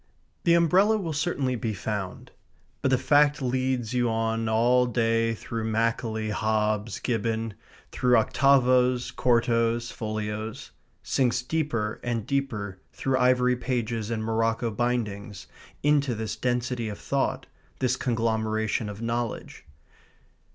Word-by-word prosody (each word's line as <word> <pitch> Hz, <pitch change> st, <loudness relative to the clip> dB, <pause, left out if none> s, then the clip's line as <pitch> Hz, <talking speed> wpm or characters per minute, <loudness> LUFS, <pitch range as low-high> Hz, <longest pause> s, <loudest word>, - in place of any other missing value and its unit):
The 170 Hz, -1 st, +5 dB
umbrella 185 Hz, +6 st, +4 dB
will 170 Hz, -6 st, -3 dB
certainly 145 Hz, -4 st, -1 dB
be 110 Hz, -2 st, -3 dB
found. 100 Hz, -2 st, -5 dB, 0.5 s
But -, -, +1 dB
the 130 Hz, -, +4 dB
fact 145 Hz, +2 st, +3 dB
leads 130 Hz, -2 st, -1 dB
you 120 Hz, -1 st, +2 dB
on 115 Hz, 0 st, -1 dB
all 120 Hz, +3 st, +3 dB
day 115 Hz, -1 st, +1 dB
through 115 Hz, 0 st, -5 dB
Macaulay, 110 Hz, -1 st, -1 dB
Hobbes, 110 Hz, 0 st, 0 dB
Gibbon; 115 Hz, -2 st, -1 dB, 0.4 s
through 125 Hz, -1 st, +3 dB
octavos, 125 Hz, 0 st, +3 dB
quartos, 115 Hz, -1 st, +1 dB
folios; 110 Hz, 0 st, -5 dB, 0.3 s
sinks 125 Hz, -1 st, +1 dB
deeper 125 Hz, -8 st, -1 dB
and 115 Hz, -3 st, -2 dB
deeper 105 Hz, -9 st, -2 dB
through 135 Hz, -1 st, -1 dB
ivory 125 Hz, 0 st, +3 dB
pages 120 Hz, -3 st, -2 dB
and 110 Hz, -2 st, -2 dB
morocco 115 Hz, +1 st, 0 dB
bindings 105 Hz, -4 st, -2 dB, 0.4 s
into 140 Hz, -4 st, +2 dB
this 110 Hz, -1 st, -4 dB
density 120 Hz, -2 st, -1 dB
of 105 Hz, -, -6 dB
thought, 140 Hz, -1 st, -1 dB, 0.3 s
this 125 Hz, -1 st, +1 dB
conglomeration 110 Hz, -2 st, -1 dB
of 105 Hz, +2 st, -7 dB
knowledge. 115 Hz, 0 st, -3 dB
115 Hz, 120 wpm, -26 LUFS, 110-125 Hz, 0.5 s, The